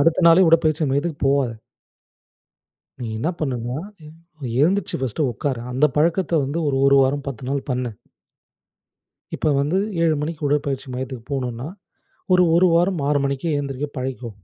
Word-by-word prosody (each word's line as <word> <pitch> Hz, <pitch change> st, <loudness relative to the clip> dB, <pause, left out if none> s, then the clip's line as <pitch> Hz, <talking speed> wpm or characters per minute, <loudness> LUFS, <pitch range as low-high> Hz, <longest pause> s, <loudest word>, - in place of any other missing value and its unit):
அடுத்த 165 Hz, +4 st, +3 dB
நாளே 170 Hz, +3 st, +7 dB
உடற்பயிற்சி 160 Hz, -1 st, +3 dB
மையத்துக்கு 145 Hz, +3 st, -1 dB
போவாத. 135 Hz, -3 st, +2 dB, 1.5 s
நீ 120 Hz, -, -3 dB
என்ன 125 Hz, +9 st, -1 dB
பண்ணுனா, 125 Hz, -4 st, -2 dB, 0.3 s
எ -, -, -11 dB, 0.5 s
எழுந்துருச்சு 185 Hz, +4 st, +1 dB
ஃபஸ்ட்டு 130 Hz, +3 st, -1 dB
உக்காரு. 130 Hz, 0 st, -2 dB
அந்த 135 Hz, +4 st, +3 dB
பழக்கத்த 170 Hz, +2 st, +2 dB
வந்து 140 Hz, +5 st, -3 dB
ஒரு 140 Hz, -, +1 dB
ஒரு 140 Hz, 0 st, +5 dB
வாரம் 135 Hz, +1 st, 0 dB
10 130 Hz, -3 st, -6 dB
நாள் 140 Hz, +1 st, -2 dB
பண்ணு. 125 Hz, -1 st, -1 dB, 1.5 s
இப்ப -, -, -2 dB
வந்து 150 Hz, +6 st, 0 dB, 0.3 s
7 160 Hz, -2 st, +3 dB
மணிக்கு 155 Hz, -1 st, -4 dB
உடற்பயிற்சி 140 Hz, -1 st, -1 dB
மையத்துக்கு 130 Hz, -2 st, -6 dB
போணும்னா, 125 Hz, -1 st, -3 dB, 0.7 s
ஒரு 180 Hz, -, +5 dB
ஒரு 180 Hz, +1 st, +5 dB
வாரம் 175 Hz, -2 st, +2 dB
6 145 Hz, -, +3 dB
மணிக்கே 140 Hz, +4 st, -1 dB
எழுந்திரிக்க 140 Hz, 0 st, -3 dB
பழகிக்கோ. 130 Hz, -2 st, -4 dB
140 Hz, 145 wpm, -22 LUFS, 130-160 Hz, 1.5 s, நாளே